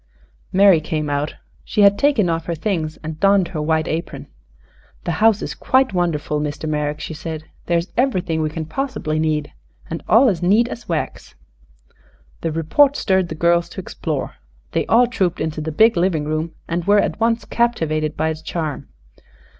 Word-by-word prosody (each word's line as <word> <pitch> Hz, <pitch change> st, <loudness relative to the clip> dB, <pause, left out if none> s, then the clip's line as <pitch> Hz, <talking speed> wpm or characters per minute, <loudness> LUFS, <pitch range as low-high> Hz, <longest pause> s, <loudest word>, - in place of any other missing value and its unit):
Mary 190 Hz, -4 st, +5 dB
came 155 Hz, -1 st, -2 dB
out. 145 Hz, +1 st, -2 dB, 0.3 s
She 210 Hz, -, 0 dB
had 200 Hz, 0 st, +6 dB
taken 280 Hz, -9 st, +3 dB
off 165 Hz, -1 st, -1 dB
her 170 Hz, -, -1 dB
things 160 Hz, -2 st, -2 dB
and 155 Hz, 0 st, -6 dB
donned 195 Hz, -2 st, +3 dB
her 160 Hz, -4 st, -4 dB
white 160 Hz, +1 st, +1 dB
apron. 165 Hz, +2 st, -4 dB, 0.8 s
"The -, -, -2 dB
house 220 Hz, -2 st, +4 dB
is -, -, -4 dB
quite 260 Hz, -4 st, +2 dB
wonderful, 155 Hz, -4 st, -1 dB
Mr. 150 Hz, +1 st, -4 dB
Merrick," 150 Hz, 0 st, -1 dB
she 160 Hz, -, -5 dB
said. 155 Hz, 0 st, -6 dB, 0.2 s
"There 170 Hz, -, +2 dB
is 170 Hz, +3 st, -3 dB
everything 185 Hz, -11 st, 0 dB
we 155 Hz, -, 0 dB
can 160 Hz, +1 st, -5 dB
possibly 160 Hz, -, -3 dB
need, 155 Hz, -2 st, -1 dB, 0.4 s
and 165 Hz, -, -3 dB
all 245 Hz, +5 st, +6 dB
as 190 Hz, -7 st, 0 dB
neat 210 Hz, +7 st, +3 dB
as 235 Hz, -, -8 dB
wax." 165 Hz, -2 st, -4 dB, 1.1 s
The 165 Hz, -, -1 dB
report 265 Hz, -, +3 dB
stirred 190 Hz, -7 st, +1 dB
the 160 Hz, -, -5 dB
girls 170 Hz, +1 st, +2 dB
to -, -, -8 dB
explore. 190 Hz, -, -4 dB, 0.3 s
They -, -, -1 dB
all 240 Hz, +2 st, +5 dB
trooped 190 Hz, -7 st, -1 dB
into 155 Hz, 0 st, -3 dB
the 160 Hz, +1 st, -3 dB
big 220 Hz, +8 st, +4 dB
living 170 Hz, -4 st, +1 dB
room 155 Hz, +2 st, -3 dB
and 170 Hz, +1 st, -2 dB
were 205 Hz, +1 st, +5 dB
at -, -, -1 dB
once 230 Hz, 0 st, +1 dB
captivated 155 Hz, -10 st, 0 dB
by 160 Hz, +1 st, +1 dB
its 160 Hz, 0 st, -4 dB
charm. 155 Hz, -, -4 dB
170 Hz, 180 wpm, -20 LUFS, 155-200 Hz, 1.1 s, had